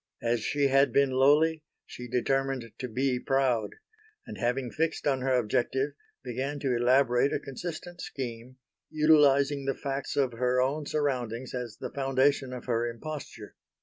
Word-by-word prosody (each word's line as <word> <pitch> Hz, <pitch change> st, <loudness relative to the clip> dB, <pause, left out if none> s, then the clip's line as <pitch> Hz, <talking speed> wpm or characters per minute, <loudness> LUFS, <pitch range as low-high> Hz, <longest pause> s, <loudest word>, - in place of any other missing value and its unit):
As 120 Hz, 0 st, +1 dB
she 140 Hz, +5 st, +1 dB
had 135 Hz, +1 st, +4 dB
been 140 Hz, -1 st, +3 dB
lowly 150 Hz, +5 st, +4 dB, 0.2 s
she 125 Hz, -, -9 dB
determined 130 Hz, 0 st, -1 dB
to 130 Hz, -, -3 dB
be 125 Hz, +2 st, 0 dB
proud; 125 Hz, -6 st, 0 dB, 0.5 s
and -, -, -8 dB
having 125 Hz, 0 st, -1 dB
fixed 160 Hz, +1 st, -1 dB
on 135 Hz, -3 st, +1 dB
her 130 Hz, 0 st, +1 dB
objective 125 Hz, +4 st, 0 dB, 0.3 s
began 130 Hz, +4 st, -3 dB
to 130 Hz, -3 st, +1 dB
elaborate 125 Hz, +2 st, +3 dB
a -, -, 0 dB
consistent 175 Hz, +5 st, -7 dB
scheme, 125 Hz, -1 st, -6 dB, 0.3 s
utilising 145 Hz, -3 st, +4 dB
the 135 Hz, -1 st, 0 dB
facts 140 Hz, -1 st, -4 dB
of 135 Hz, -3 st, +2 dB
her 125 Hz, +2 st, 0 dB
own 140 Hz, +3 st, 0 dB
surroundings 130 Hz, -5 st, -2 dB
as 120 Hz, -3 st, -5 dB
the -, -, -6 dB
foundation 135 Hz, 0 st, +1 dB
of 125 Hz, -1 st, -7 dB
her 120 Hz, -1 st, 0 dB
imposture. 145 Hz, +5 st, -8 dB
135 Hz, 150 wpm, -28 LUFS, 125-140 Hz, 0.5 s, had